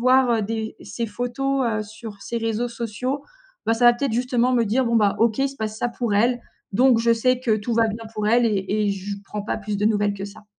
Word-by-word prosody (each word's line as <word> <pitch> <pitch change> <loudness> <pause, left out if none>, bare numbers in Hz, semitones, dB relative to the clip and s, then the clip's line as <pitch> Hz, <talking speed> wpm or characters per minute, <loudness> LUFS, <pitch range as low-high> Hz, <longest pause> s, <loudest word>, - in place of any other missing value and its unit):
voir 250 -3 +4
des 220 +1 -4
ses 235 -1 -4
photos, 255 +4 -1
heu, 215 -2 0
sur 215 -1 -10
ses 235 - -5
réseaux 225 +1 -1
sociaux, 240 +4 -4 0.4
ben, 225 - +2
ça 240 +1 +3
va 240 - +8
peut-être 270 0 -2
justement 250 +1 +1
me 235 -2 +3
dire: 255 +6 +2
«Bon, 235 -1 +2
bah, 205 -2 +3
OK, 225 0 +2
il 275 - +2
se 275 - -11
passe 215 -1 -4
ça 240 - 0
pour 235 -3 -2
elle, 240 +3 +2 0.3
donc 250 +2 +5
je 230 0 +3
sais 255 +2 +1
que 230 -4 +2
tout 220 +3 -3
va 225 0 +3
bien 220 +2 -5
pour 215 -1 -1
elle» 240 +1 +4
et 210 0 0
et - - +2
je 200 +1 -5
prends 210 - -5
pas 205 - -2
plus 205 -1 -4
de 210 - +2
nouvelles 205 -2 +2
que 195 0 -5
ça. 205 +1 -13
230 Hz, 250 wpm, -23 LUFS, 210-245 Hz, 0.4 s, va